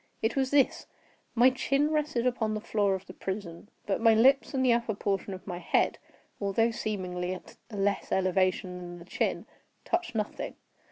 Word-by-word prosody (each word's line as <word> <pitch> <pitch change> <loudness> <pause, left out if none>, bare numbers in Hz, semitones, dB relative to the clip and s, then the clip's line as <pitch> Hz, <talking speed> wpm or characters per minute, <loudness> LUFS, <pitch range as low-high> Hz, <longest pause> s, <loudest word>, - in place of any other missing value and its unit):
It 225 - +1
was 265 -1 +1
this: 280 -2 +2 0.5
my 245 +2 +6
chin 275 +3 +1
rested 300 -6 0
upon 225 -4 0
the - - -2
floor 205 -2 +1
of 190 0 -7
the - - -10
prison, 190 -1 -6 0.2
but 200 +2 -1
my 225 -1 +6
lips 260 +2 +5
and 260 0 +2
the 245 - +5
upper 235 -2 0
portion 195 0 -1
of 185 -1 -8
my 175 -3 -5
head, 175 - +1 0.4
although 215 +3 +2
seemingly 185 -5 -3
at 180 - -12
a 220 - -8
less 200 +1 0
elevation 185 0 +1
than 175 0 -8
the 170 - -12
chin, - - -1 0.4
touched 350 -7 -1
nothing. 210 -1 -3
215 Hz, 180 wpm, -29 LUFS, 190-245 Hz, 0.5 s, my